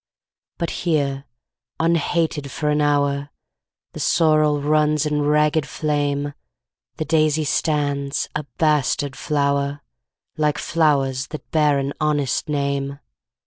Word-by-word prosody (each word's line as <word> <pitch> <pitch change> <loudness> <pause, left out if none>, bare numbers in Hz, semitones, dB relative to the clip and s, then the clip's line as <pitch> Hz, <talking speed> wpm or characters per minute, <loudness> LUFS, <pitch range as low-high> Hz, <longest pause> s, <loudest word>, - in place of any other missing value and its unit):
But 170 - -2
here, 140 -5 -1 0.5
unhated 165 -2 0
for 150 +3 -2
an 150 0 +1
hour, 145 -1 +1 0.6
The - - -7
sorrel 155 -3 +3
runs 150 +1 +2
in 150 -1 0
ragged 150 +1 +2
flame, 145 -1 -1 0.6
The 155 - -2
daisy 155 -1 +2
stands, 145 -2 0
a 150 -1 -3
bastard 145 -3 +1
flower, 140 -1 0 0.6
Like 150 -1 +1
flowers 140 -5 +1
that 155 - -9
bear 150 -3 +3
an 140 +1 -2
honest 150 -1 0
name. 140 -1 -1
150 Hz, 110 wpm, -21 LUFS, 140-155 Hz, 0.6 s, sorrel